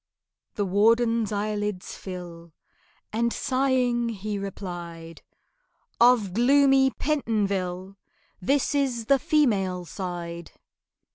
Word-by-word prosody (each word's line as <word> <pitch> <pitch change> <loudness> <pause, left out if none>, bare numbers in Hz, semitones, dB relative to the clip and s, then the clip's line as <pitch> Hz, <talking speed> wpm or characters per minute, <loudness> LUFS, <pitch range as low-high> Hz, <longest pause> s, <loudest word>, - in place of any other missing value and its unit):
The 205 - 0
warden's 225 +3 +2
eyelids 210 -2 -3
fill, 170 -3 -9 0.6
And 235 +1 +1
sighing, 255 -3 +1
he 210 -1 -4
replied, 175 -4 -7 0.8
"Of 235 -6 +4
gloomy 270 +3 +4
Pentonville 200 -10 -2 0.4
This 275 +10 +1
is 260 -5 0
the 275 +3 +4
female 195 - +1
side!" 170 -2 -6
210 Hz, 85 wpm, -25 LUFS, 185-245 Hz, 0.8 s, Of